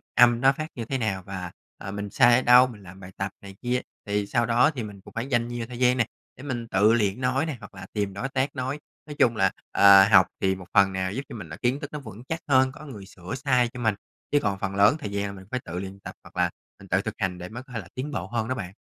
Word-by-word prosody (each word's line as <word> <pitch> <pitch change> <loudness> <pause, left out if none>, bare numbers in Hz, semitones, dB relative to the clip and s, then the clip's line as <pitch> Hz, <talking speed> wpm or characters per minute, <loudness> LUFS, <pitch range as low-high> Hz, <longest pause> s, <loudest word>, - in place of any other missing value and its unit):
âm 120 -1 +6
nó 135 - +6
phát 155 0 -3
như 115 -2 -4
thế 135 - -2
nào 100 -6 -2
và, 95 -2 -6 0.3
ờ, 100 - -7
mình 100 0 -5
sai 120 +4 +5
ở 130 - +3
đâu, 125 +1 +7
làm 95 -2 -13
bài 95 -1 -11
tập 95 0 -2
này 100 -1 -11
kia. 125 0 0 0.2
Thì 105 0 -1
sau 120 +2 +1
đó 120 +5 +4
thì 125 - -3
mình 100 -2 -9
cũng - - -15
phải 115 +3 -3
dành 120 -3 +1
nhiều 120 -1 -5
thời 125 0 -8
gian 125 0 +4
nè, 120 - +3 0.3
để 130 - -11
mình 120 -5 -4
tự 105 +3 +4
luyện 105 0 +1
nói 130 +3 +1
nè 155 -5 -4
hoặc 105 -2 -13
là 95 0 -9
tìm 100 -2 -1
đối 120 +8 -4
tác 135 +2 -1
nói. 130 +3 -3 0.3
Nói 150 - -7
chung 115 -2 +4
là, 95 -3 +3 0.2
ờ, 100 -1 +8
học 95 -2 +7
thì 95 0 +2
một 90 -2 -11
phần 95 -1 +5
nào 95 0 -1
giúp 135 - -2
cho - - -7
mình 90 -7 -8
là 75 - -8
kiến 125 +4 0
thức 145 - -7
nó 150 - -4
vững 110 -2 -10
chắc 165 - -2
hơn, 130 -2 +4
có 155 +3 -12
người 105 -9 -9
sửa 95 +5 -8
sai 125 -3 +2
cho 125 - -7
mình, 110 -3 +1 0.4
chứ 145 - +4
còn 100 -1 -1
phần 95 0 -3
lớn 100 +8 +5
thời 105 -8 -5
gian 100 0 -1
là 100 - -5
mình 95 -1 -12
phải 125 - -1
tự 90 +2 -5
luyện 95 +1 -7
tập - - -9
hoặc - - -16
là - - +3 0.3
mình 95 - -13
tự 95 - +2
thực 110 0 -4
hành 95 -3 -2
để 90 +1 -7
mới 120 +3 -8
có 125 -2 -15
thể 110 - -2
là 85 - -9
tiến 140 +4 -4
bộ 95 -8 -4
hơn 110 0 -2
đó 130 - -1
bạn. 95 -5 -6
110 Hz, 300 wpm, -26 LUFS, 95-125 Hz, 0.4 s, ờ